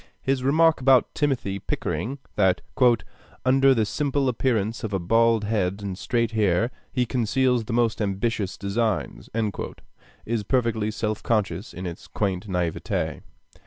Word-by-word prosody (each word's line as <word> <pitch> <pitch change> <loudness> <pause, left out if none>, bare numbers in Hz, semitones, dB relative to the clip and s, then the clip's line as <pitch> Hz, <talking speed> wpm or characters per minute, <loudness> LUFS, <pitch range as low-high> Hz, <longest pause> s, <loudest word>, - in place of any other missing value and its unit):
His 135 -1 +1
remark 155 +3 +4
about 130 -1 +4
Timothy 125 -10 -1
Pickering, 105 - -3 0.2
that 95 -3 +3 0.8
"under 135 +1 +5
the 110 -2 +2
simple 140 +3 0
appearance 115 -3 0
of 110 -2 -3
a 95 - +1
bald 115 +4 +3
head 100 -2 -1
and 95 -2 -3
straight 115 +3 0
hair, 110 +1 +2 0.2
he 125 -1 +1
conceals 125 0 +1
the 115 - -4
most 115 -2 +1
ambitious 100 0 -1
designs," 100 - -2 1.0
is 115 -1 -1
perfectly 115 -1 0
self 110 -1 -2
conscious 105 -5 -1
in 90 +2 -7
its 85 -1 -7
quaint 100 0 -2
naiveté. 90 -4 -2
110 Hz, 135 wpm, -25 LUFS, 100-125 Hz, 1.0 s, under